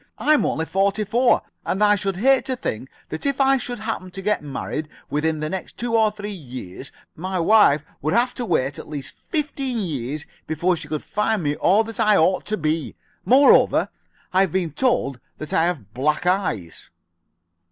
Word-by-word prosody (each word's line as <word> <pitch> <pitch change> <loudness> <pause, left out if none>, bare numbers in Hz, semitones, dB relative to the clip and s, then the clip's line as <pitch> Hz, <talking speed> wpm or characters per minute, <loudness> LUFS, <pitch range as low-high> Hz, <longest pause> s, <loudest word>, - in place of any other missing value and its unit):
I'm 305 -1 +3
only 160 - -1
forty 195 +4 +1
four, 240 +5 +2 0.2
and 195 +3 0
I 205 0 +6
should 195 -2 -2
hate 265 +5 +3
to 260 - -1
think 130 - -4 0.2
that 160 - -5
if 275 -1 0
I 270 0 +4
should 245 -1 -5
happen 215 -4 -4
to 195 +1 -8
get 210 +1 +1
married 150 +1 -5 0.2
within 155 +1 0
the 155 - -1
next 190 - -6
two 235 -1 -1
or 220 -1 +4
three 210 0 -7
years 130 - -8 0.2
my 185 +3 -3
wife 170 -5 +5 0.2
would 155 +3 0
have 245 +2 +2
to 250 - -4
wait 140 - 0
at - - -10
least 145 -3 -6
fifteen 280 -5 -3
years 150 - -3 0.2
before 170 +4 +1
she 160 -2 -7
could 155 -1 -4
find 210 -2 -1
me 145 0 0
all 205 +8 +3
that 225 +1 -8
I 210 -2 +4
ought 185 +4 +2
to 215 - -1
be. 155 -1 -1 0.3
Moreover, 275 +3 +5 0.4
I 190 - +5
have 190 -4 +1
been 180 -3 -1
told 150 - 0 0.2
that 155 - -7
I 160 - +3
have 125 - -4
black 150 +7 0
eyes." 180 - -1
185 Hz, 190 wpm, -22 LUFS, 155-220 Hz, 0.4 s, I